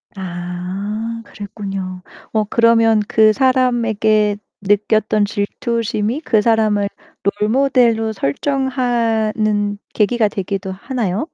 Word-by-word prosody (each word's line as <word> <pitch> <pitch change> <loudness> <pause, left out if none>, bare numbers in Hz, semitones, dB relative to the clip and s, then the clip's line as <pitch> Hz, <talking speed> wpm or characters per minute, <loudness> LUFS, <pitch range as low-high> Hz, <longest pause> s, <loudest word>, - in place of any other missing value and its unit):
아 190 +5 -5
그랬군요. 195 -3 -6 0.3
어 215 -1 +1
그러면 230 0 +4
그 215 -1 +4
사람에게 225 -5 +2 0.2
느꼈던 210 +1 +2
질투심이 220 +4 -2
그 225 -8 +2
사람을 215 -2 +2 0.5
롤 210 - +2
모델로 235 -3 +2
설정하는 220 - 0 0.2
계기가 220 +1 +2
되기도 195 -1 -4
하나요? 210 +1 -2
215 Hz, 220 characters per minute, -18 LUFS, 205-230 Hz, 0.5 s, 그러면